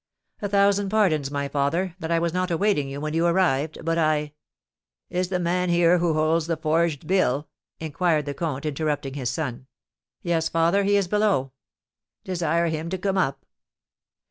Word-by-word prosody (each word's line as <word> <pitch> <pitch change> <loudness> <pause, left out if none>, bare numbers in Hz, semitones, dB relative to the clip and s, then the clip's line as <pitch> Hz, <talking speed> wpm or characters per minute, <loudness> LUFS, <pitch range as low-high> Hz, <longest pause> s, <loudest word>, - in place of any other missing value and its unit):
"A 205 - -2
thousand 200 0 +3
pardons, 175 -10 +2
my 140 0 -2
father, 165 +6 -1
that 160 - -5
I 170 - +2
was 170 0 0
not 185 +1 -1
awaiting 165 -5 +1
you 140 +1 -6
when 155 +1 -3
you 165 +1 +2
arrived; 160 -3 0
but 165 0 +1
I 150 -2 +1 0.4
" - - -70
"Is 180 0 -1
the 185 - 0
man 180 +1 0
here 175 0 +4
who 170 -2 +1
holds 155 +1 +1
the 165 -1 -1
forged 160 -1 0
bill?" 150 -6 +1 0.3
inquired 155 0 0
the 145 - -3
comte, 145 -2 -4
interrupting 150 -2 -2
his 130 -4 -3
son. 130 -2 -4 0.6
"Yes, 165 -2 0
father, 170 +5 +2
he 205 +1 +3
is 195 -2 +1
below." 200 -10 +1 0.7
"Desire 170 -2 0
him 160 +1 -3
to 190 - -2
come 195 +1 -1
up." 135 -5 -1
165 Hz, 175 wpm, -24 LUFS, 150-180 Hz, 0.7 s, here